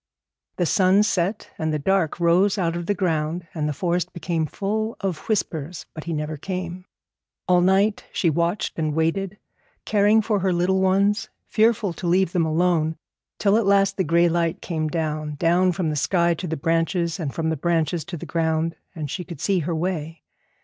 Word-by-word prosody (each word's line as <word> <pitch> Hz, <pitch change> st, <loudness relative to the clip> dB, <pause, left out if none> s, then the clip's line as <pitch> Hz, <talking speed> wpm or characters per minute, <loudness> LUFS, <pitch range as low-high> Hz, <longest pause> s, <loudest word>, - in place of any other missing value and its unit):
The 175 Hz, -, 0 dB
sun 190 Hz, +3 st, +4 dB
set 200 Hz, 0 st, -1 dB
and 160 Hz, -1 st, 0 dB
the 155 Hz, -, 0 dB
dark 180 Hz, +1 st, 0 dB
rose 180 Hz, +4 st, +3 dB
out 170 Hz, -3 st, 0 dB
of 175 Hz, 0 st, -4 dB
the 205 Hz, -, +1 dB
ground, 170 Hz, -2 st, -1 dB
and 150 Hz, -2 st, -1 dB
the -, -, 0 dB
forest 175 Hz, +3 st, -1 dB
became 170 Hz, -3 st, -2 dB
full 215 Hz, +6 st, -2 dB
of 190 Hz, -5 st, -2 dB
whispers, 170 Hz, -6 st, -2 dB
but 155 Hz, -, -8 dB
he 170 Hz, -, -3 dB
never 150 Hz, 0 st, -3 dB
came. 180 Hz, +2 st, -5 dB, 0.6 s
All 180 Hz, -1 st, +4 dB
night 195 Hz, +3 st, +2 dB
she 175 Hz, -, 0 dB
watched 170 Hz, +4 st, 0 dB
and 155 Hz, -2 st, -1 dB
waited, 185 Hz, +5 st, 0 dB, 0.5 s
caring 210 Hz, +1 st, +4 dB
for 210 Hz, -1 st, +1 dB
her 190 Hz, 0 st, +1 dB
little 180 Hz, +2 st, +1 dB
ones, 200 Hz, +3 st, +2 dB, 0.2 s
fearful 220 Hz, -3 st, +2 dB
to 175 Hz, -, -5 dB
leave 180 Hz, 0 st, +3 dB
them 170 Hz, -3 st, +1 dB
alone, 160 Hz, -1 st, +1 dB, 0.4 s
till 205 Hz, 0 st, +3 dB
at 225 Hz, -3 st, +1 dB
last 195 Hz, -1 st, +3 dB
the 190 Hz, -, +2 dB
gray 170 Hz, +1 st, +3 dB
light 170 Hz, -1 st, 0 dB
came 155 Hz, -3 st, -2 dB
down, 155 Hz, -2 st, -2 dB
down 175 Hz, +4 st, +3 dB
from 170 Hz, -3 st, -1 dB
the -, -, -2 dB
sky 170 Hz, +3 st, +2 dB
to 180 Hz, +2 st, -5 dB
the 160 Hz, -1 st, -3 dB
branches, 165 Hz, +3 st, 0 dB
and 150 Hz, -5 st, -2 dB
from 160 Hz, -1 st, -1 dB
the -, -, 0 dB
branches 165 Hz, +1 st, 0 dB
to 175 Hz, 0 st, -6 dB
the -, -, -7 dB
ground, 165 Hz, 0 st, 0 dB, 0.2 s
and 150 Hz, -4 st, -5 dB
she 180 Hz, -, -4 dB
could 170 Hz, -4 st, -9 dB
see 190 Hz, +3 st, +1 dB
her 165 Hz, +1 st, -2 dB
way. 160 Hz, -2 st, -3 dB
175 Hz, 190 wpm, -23 LUFS, 160-190 Hz, 0.6 s, sun